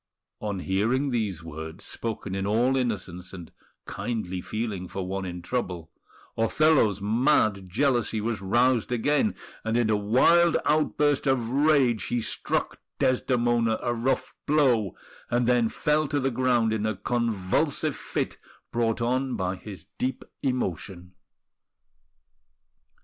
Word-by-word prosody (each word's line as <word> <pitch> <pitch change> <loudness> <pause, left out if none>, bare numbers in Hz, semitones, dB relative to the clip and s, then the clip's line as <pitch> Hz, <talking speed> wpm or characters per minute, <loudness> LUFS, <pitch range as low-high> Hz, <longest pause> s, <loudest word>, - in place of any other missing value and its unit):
On 100 -3 -3
hearing 115 +10 +1
these 105 -8 -2
words, 80 0 -7
spoken 110 -4 -4
in 95 0 -2
all 120 +5 +2
innocence 95 -8 -3
and 90 -3 -9 0.3
kindly 95 -7 -3
feeling 105 -4 -4
for 95 +1 -4
one 95 +1 -3
in 90 -1 -6
trouble, 90 -7 -3 0.4
Othello's 115 -3 +3
mad 110 -3 +2
jealousy 120 0 +1
was 110 -1 -2
roused 120 +5 +2
again; 145 - +1 0.3
and 115 +1 0
in 115 -2 +2
a - - +4
wild 130 +12 +4
outburst 150 -2 +2
of 125 -4 +1
rage 135 -5 +3
he 120 - -1
struck 115 - -2 0.2
Desdemona 120 -3 +2
a 120 - -1
rough 120 +3 -1
blow, 125 - +3 0.3
and 120 0 +1
then 120 -2 +3
fell 150 +4 +1
to 145 0 0
the 135 0 0
ground 120 -2 +2
in 110 0 0
a 110 - -1
convulsive 105 -2 0
fit - - -3 0.3
brought 115 0 0
on 130 +1 0
by 95 -3 -1
his 95 -3 -10
deep 130 +1 -2 0.2
emotion. 95 - -3
115 Hz, 130 wpm, -26 LUFS, 95-130 Hz, 0.4 s, a